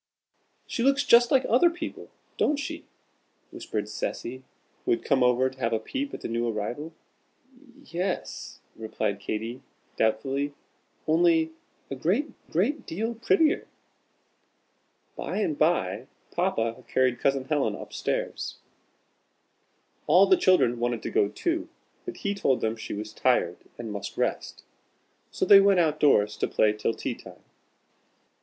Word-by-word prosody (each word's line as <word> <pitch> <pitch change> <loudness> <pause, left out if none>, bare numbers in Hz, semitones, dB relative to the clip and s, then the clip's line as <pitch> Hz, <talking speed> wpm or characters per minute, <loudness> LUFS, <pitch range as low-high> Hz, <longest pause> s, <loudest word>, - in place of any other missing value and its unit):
"She - - -3
looks 275 +3 +3
just 240 0 +6
like 265 -1 +3
other 255 +10 +5
people, 340 +1 -7 0.3
don't 300 - +2
she?" 290 - -5 0.7
whispered - - -4
Cecy, 130 - -4 0.4
who - - -4
had 115 - +2
come 140 -2 +2
over 125 +1 +4
to 130 0 -9
have 115 -2 0
a 110 - +1
peep 275 - -4
at - - -7
the - - -4
new 115 +1 -1
arrival. 120 +9 -4 0.6
"Y 250 -1 -20
e 170 - -3
s," 185 0 -4
replied 110 -2 -3
Katy, 115 +5 -4 0.4
doubtfully, 135 +6 0 0.5
"only 160 0 +3 0.4
a - - -2
great, 200 - 0 0.2
great 225 - 0
deal 225 +8 -2
prettier." 305 +8 +2 1.5
By - - -4
and 205 -8 0
by, 160 +4 +1 0.2
Papa 115 0 -1
carried 130 -2 +1
Cousin 135 -1 +1
Helen 145 0 0
up - - -10
stairs. - - -3 1.5
All - - +7
the 380 - +5
children 180 - +3
wanted 120 -1 -1
to - - -4
go 100 - +3
too, 335 - -2 0.4
but 360 - -6
he 200 - +1
told 140 -10 +1
them 110 0 0
she 110 - -6
was 105 +1 -6
tired, 120 -9 +1 0.2
and 115 -2 -6
must 100 - -6
rest. - - -2 0.7
So - - -1
they 200 -1 +9
went 195 -2 +4
out 155 -3 +2
doors 105 -8 +3
to - - 0
play 105 -1 +2
till 105 +1 -1
tea - - -3
time. - - -14
145 Hz, 150 wpm, -27 LUFS, -, 1.5 s, they